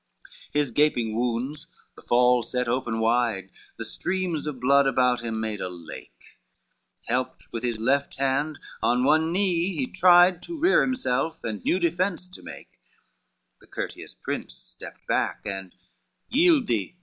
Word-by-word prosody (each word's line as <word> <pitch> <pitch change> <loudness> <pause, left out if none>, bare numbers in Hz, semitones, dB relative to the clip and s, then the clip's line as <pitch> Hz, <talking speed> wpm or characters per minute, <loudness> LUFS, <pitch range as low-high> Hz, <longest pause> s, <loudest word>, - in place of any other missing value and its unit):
XXV - - -23
His 145 -4 0
gaping 120 -5 +1
wounds 125 +6 -2 0.3
the - - -14
fall 125 0 +4
set 125 +2 -2
open 120 -2 -1
wide, 110 -5 +1 0.3
The - - -5
streams 175 -4 -2
of 140 -4 -4
blood 140 +2 +4
about 125 -2 +2
him 110 -1 -3
made 110 -2 -3
a 90 - -3
lake, 85 -2 -12 0.7
Helped 125 +2 -3
with 115 - -4
his 120 -2 -1
left 135 +5 0
hand, 140 +3 0 0.2
on 125 +1 +2
one 155 +4 +3
knee 180 -1 +1
he 135 -4 0
tried 175 +3 +5
To 340 - -7
rear 360 +6 +5
himself, 160 - -1
and 105 -4 -4
new - - +2
defence 180 +1 -1
to 185 - -12
make: - - -12 0.8
The - - -21
courteous - - -6
prince - - -5
stepped - - -11
back, - - 0
and 95 -2 -5 0.6
"Yield 310 -1 +4
thee!" 115 - -2
135 Hz, 155 wpm, -25 LUFS, 115-170 Hz, 0.8 s, tried